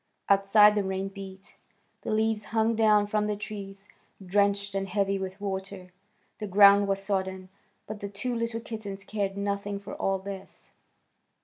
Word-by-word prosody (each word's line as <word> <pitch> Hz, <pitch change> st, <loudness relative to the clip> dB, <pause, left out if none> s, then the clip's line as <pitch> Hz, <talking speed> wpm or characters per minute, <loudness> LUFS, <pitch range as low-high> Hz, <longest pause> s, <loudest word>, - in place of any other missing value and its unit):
Outside 200 Hz, +1 st, +6 dB
the 205 Hz, -1 st, 0 dB
rain 190 Hz, 0 st, -2 dB
beat. 195 Hz, -1 st, -11 dB, 0.4 s
The -, -, -6 dB
leaves 220 Hz, -1 st, 0 dB
hung 225 Hz, +1 st, +1 dB
down 215 Hz, -2 st, +4 dB
from 210 Hz, 0 st, 0 dB
the 210 Hz, -, -1 dB
trees, 200 Hz, -1 st, -8 dB, 0.4 s
drenched 200 Hz, +1 st, +1 dB
and 195 Hz, 0 st, -2 dB
heavy 195 Hz, 0 st, 0 dB
with 190 Hz, +1 st, -6 dB
water; 190 Hz, -2 st, -5 dB, 0.5 s
the 210 Hz, -, -4 dB
ground 200 Hz, +1 st, +6 dB
was 195 Hz, 0 st, -1 dB
sodden, 190 Hz, -1 st, -2 dB, 0.4 s
but 215 Hz, 0 st, -7 dB
the 200 Hz, -, -5 dB
two 210 Hz, +5 st, -3 dB
little 230 Hz, -1 st, -2 dB
kittens 205 Hz, -4 st, -7 dB
cared 200 Hz, -1 st, -3 dB
nothing 200 Hz, 0 st, -2 dB
for 200 Hz, -, -9 dB
all 195 Hz, 0 st, 0 dB
this. 195 Hz, 0 st, -9 dB
200 Hz, 155 wpm, -28 LUFS, 195-210 Hz, 0.5 s, Outside